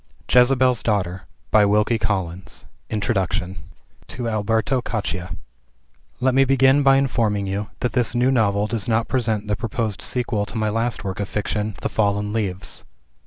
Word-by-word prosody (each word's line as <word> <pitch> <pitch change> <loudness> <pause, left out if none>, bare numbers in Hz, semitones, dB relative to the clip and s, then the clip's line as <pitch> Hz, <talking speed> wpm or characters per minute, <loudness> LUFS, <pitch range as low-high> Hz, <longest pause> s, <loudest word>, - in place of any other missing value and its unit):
JEZEBEL'S 125 0 +4
DAUGHTER 95 -5 -1 0.2
by 110 - +6
Wilkie 105 +3 +2
Collins 95 -3 -3 0.2
TO 95 - -4
ALBERTO 110 +4 0
CACCIA 90 -7 -4 0.8
Let 130 +1 +2
me 135 +1 +5
begin 135 +1 +4
by 135 -1 +5
informing 115 -7 +1
you, 100 +2 -3
that 125 - -1
this 120 -1 +1
new 125 +2 +3
novel 105 -5 +2
does 105 +1 -2
not 115 0 +1
present 110 -5 0
the 105 0 0
proposed 115 -2 -3
sequel 115 -4 -1
to 115 - -6
my 110 -1 0
last 115 +1 -1
work 95 0 -4
of 100 - -3
fiction 105 0 -2
"The - - -1
Fallen 105 -1 0
Leaves." 95 -4 -3
110 Hz, 150 wpm, -22 LUFS, 100-120 Hz, 0.8 s, by